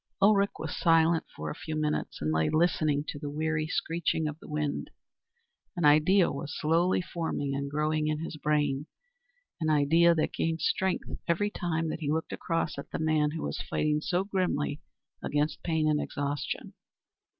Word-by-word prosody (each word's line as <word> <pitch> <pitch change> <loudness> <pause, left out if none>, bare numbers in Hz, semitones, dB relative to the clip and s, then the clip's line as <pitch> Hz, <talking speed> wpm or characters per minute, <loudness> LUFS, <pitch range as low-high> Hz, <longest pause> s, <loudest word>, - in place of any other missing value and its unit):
Ulrich 200 0 +5
was - - -4
silent 165 -1 +3
for 75 0 -4
a - - -6
few 155 - -5
minutes, 150 0 -2
and 75 - +1
lay 80 0 +2
listening 155 -3 +2
to 145 - -5
the 145 -1 -4
weary 155 +1 -1
screeching 165 -1 -1
of 150 +1 -5
the - - -13
wind. 150 -2 -2 0.9
An 170 - +1
idea 155 +6 +5
was 145 +1 -5
slowly 170 +4 +2
forming 160 -5 -3
and 140 0 -2
growing 150 +1 0
in 155 0 0
his 165 - -6
brain, 150 -1 0 0.7
an 160 -2 0
idea 160 +3 +5
that 155 - 0
gained 165 -1 -1
strength 190 +4 0 0.2
every 205 +5 +1
time 165 -3 -1
that - - -3
he 150 -3 -2
looked 160 +2 -1
across 165 -4 -2
at - - -8
the - - -3
man 155 -2 +2
who 160 +1 -5
was - - -3
fighting 150 0 0
so 180 +3 0
grimly 180 -7 -1 0.4
against 150 +1 -1
pain 160 -2 +1
and 150 -1 +2
exhaustion. 145 0 -3
155 Hz, 170 wpm, -29 LUFS, 150-165 Hz, 0.9 s, Ulrich